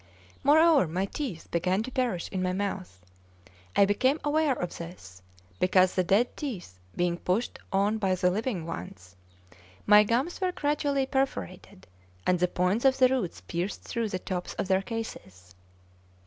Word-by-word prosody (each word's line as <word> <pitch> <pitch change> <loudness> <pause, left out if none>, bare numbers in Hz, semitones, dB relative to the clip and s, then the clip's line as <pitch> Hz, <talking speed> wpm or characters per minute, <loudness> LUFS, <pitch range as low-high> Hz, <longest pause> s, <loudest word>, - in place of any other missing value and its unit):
Moreover, 310 - +5
my 180 +5 -1
teeth 205 - -5
began 180 +4 +1
to 255 - -7
perish 240 -9 -1
in 185 - -2
my 185 0 0
mouth. 190 - -4 0.7
I 200 - +6
became 255 +9 +2
aware 295 -2 +2
of 175 - -4
this 95 - -10 0.4
because 185 0 +4
the 185 - +1
dead 200 +7 +2
teeth 185 - -6 0.2
being 175 -1 0
pushed 200 +7 -1
out 205 +3 +1
by 190 -3 +1
the 180 0 +2
living 210 -4 -2
ones, 90 - -8 0.7
my 210 0 +7
gums 250 - -1
were 365 -1 0
gradually 290 -2 0
perforated, 200 -8 -3 0.4
and 180 -1 +2
the 180 - +3
points 180 +6 0
of 265 -1 +4
the 255 -1 +5
roots 250 -10 -2
pierced 175 +4 -4
through 230 -2 -2
the 185 - -2
tops 180 -1 -5
of - - -2
their 190 0 +3
cases. 95 - -7
195 Hz, 160 wpm, -28 LUFS, 180-255 Hz, 0.7 s, my